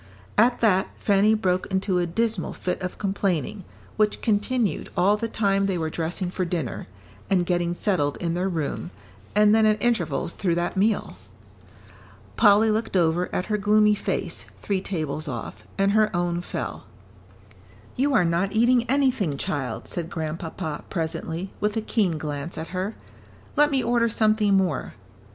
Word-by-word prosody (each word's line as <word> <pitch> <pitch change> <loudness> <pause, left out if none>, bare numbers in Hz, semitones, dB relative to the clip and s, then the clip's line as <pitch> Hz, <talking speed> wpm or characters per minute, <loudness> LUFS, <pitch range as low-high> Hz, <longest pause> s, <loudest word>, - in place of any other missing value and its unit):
At 240 +3 +3
that, 190 -5 +3
Fanny 205 +2 +3
broke 185 -4 0
into 190 -1 0
a 175 - 0
dismal 215 +2 -1
fit 180 - -3
of 180 0 -4
complaining, 195 -2 -1 0.3
which 215 -1 +2
continued 215 -3 0
all 200 +3 +4
the 230 +2 -2
time 195 -3 +1
they 190 -2 0
were 160 -1 -2
dressing 175 +3 -3
for 185 - -2
dinner, 170 -8 -3 0.4
and 180 -3 +2
getting 175 -1 0
settled 175 -8 0
in 170 -2 -2
their 180 +2 0
room, 150 - -3 0.5
and 210 0 +5
then 220 0 +5
at 215 0 +2
intervals 220 -8 0
through 175 -4 0
that 175 +3 -1
meal. 200 - 0 1.2
Polly 210 - +5
looked 220 -2 0
over 170 +1 +2
at 180 - -1
her 210 -1 -1
gloomy 210 +1 +4
face, 205 - -3
three 195 -2 -1
tables 155 -5 -3
off, 115 -4 -6
and 195 0 +3
her 215 0 +4
own 175 0 0
fell. - - -5 1.1
"You 275 +2 +2
are 180 - +4
not 170 +4 0
eating 240 +2 +3
anything, 255 - +1
child," 135 -5 -3
said 170 -1 -4
Grandpapa, 160 0 -4
presently, 165 +1 -3
with 210 +1 0
a - - +1
keen 200 -7 0
glance 150 +2 -5
at 160 +1 -5
her. 190 +4 -3 0.6
"Let 295 0 +5
me 270 -3 +1
order 235 -1 +2
something 215 -2 +3
more." 180 -10 -1
190 Hz, 160 wpm, -25 LUFS, 170-215 Hz, 1.2 s, and